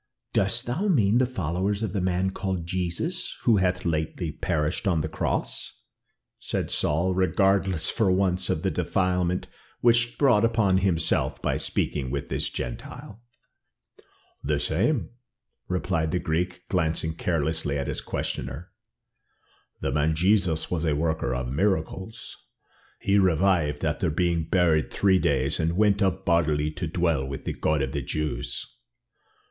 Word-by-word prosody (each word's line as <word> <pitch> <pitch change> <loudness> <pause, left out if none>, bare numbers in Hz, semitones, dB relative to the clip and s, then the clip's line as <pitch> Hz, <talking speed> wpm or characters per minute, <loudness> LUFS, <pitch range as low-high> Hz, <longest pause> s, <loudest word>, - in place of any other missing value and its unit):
"Dost 100 +5 +3
thou 150 +13 -1
mean 120 - +3
the 130 - +3
followers 100 - -1
of 105 - -2
the 100 - -1
man 95 +1 0
called 95 -3 -3
Jesus, 95 - -2
who 115 -4 +4
hath 90 -1 0
lately 80 0 -1
perished 80 +5 -1
on 85 -5 +2
the 80 - -2
cross?" 80 - -3 0.6
said - - -3
Saul, 85 +5 +1
regardless 95 -1 +2
for 110 -5 +2
once 90 -1 +1
of - - -1
the - - +1
defilement 90 -1 0 0.4
which 120 -1 +5
he 120 0 -5
brought 120 -7 +4
upon 110 -5 +3
himself 85 -4 +1
by - - -1
speaking 70 -4 -1
with 70 +2 -4
this - - -1
Gentile. 100 - -7 1.2
"The 75 0 0
same," 100 - 0 0.6
replied 90 -3 -1
the 90 - 0
Greek, 90 +2 -2
glancing 80 -2 0
carelessly 80 -3 -1
at 70 - -2
his - - -2
questioner. 65 +8 -4 1.1
"The - - -1
man 75 +3 +1
Jesus 90 -2 +2
was 85 -3 -1
a 80 -3 +1
worker 80 -4 0
of 65 0 -3
miracles. 95 - -2 0.6
He 100 +1 +3
revived 90 -5 +2
after - - 0
being 85 +1 0
buried 85 -4 +3
three 95 -2 +3
days, 70 -1 +1
and 85 +2 0
went 105 0 +3
up 95 -1 0
bodily 75 -3 +2
to 85 +2 -4
dwell 85 -4 +1
with 70 0 -6
the - - -2
God 75 -3 0
of 65 - -3
the 70 - -2
Jews." 75 +3 -3
90 Hz, 145 wpm, -26 LUFS, 80-95 Hz, 1.2 s, which